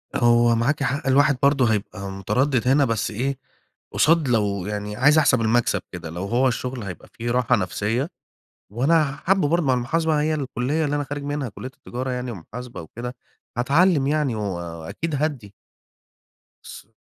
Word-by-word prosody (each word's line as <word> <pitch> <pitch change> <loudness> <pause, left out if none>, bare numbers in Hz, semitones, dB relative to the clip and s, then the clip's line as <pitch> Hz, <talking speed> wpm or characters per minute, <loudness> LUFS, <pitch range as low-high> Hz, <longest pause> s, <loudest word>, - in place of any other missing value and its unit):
هو 120 -1 +4
معاكِ 135 +5 +1
حق، 140 +3 -1
الواحد 140 0 +4
برضه 135 -5 +4
هيبقى 100 -1 -4
متردد 125 +6 0
هنا 140 +2 +4
بس 115 -3 -1
إيه، 130 +5 -2 0.6
قصاد 160 -1 +3
لو 100 -5 +1
يعني 105 0 -4
عايز 150 +6 +4
احسَب 130 -6 +4
المكسب 115 +1 +2
كده 85 -3 -7
لو 85 +4 -5
هو 120 +6 +2
الشُغل 125 -1 -3
هيبقى 90 -5 -8
فيه 120 +1 -3
راحة 125 0 +3
نَفْسية، 110 - -1 0.6
وأنا 145 +4 +2
حابُه 185 0 +2
برضه 170 +1 +1
مع 130 - +3
المحاسبة 150 +5 +1
هي 155 +1 +1
الكلّية 140 +2 -1
اللي 145 0 -1
أنا 145 - 0
خارج 145 +1 -5
منها 145 -3 -3
كلّية 130 +6 -8
التجارة 130 +1 -5
يعني 125 -1 -3
ومحاسبة 115 +4 -8
وكده، 120 +10 -7 0.4
هاتعلّم 145 +4 +3
يعني 145 -4 +1
و 110 - -3
وأكيد 85 - -4
هادّي. 135 -9 -2 1.1
بس - - -11
125 Hz, 160 wpm, -23 LUFS, 110-145 Hz, 1.1 s, هو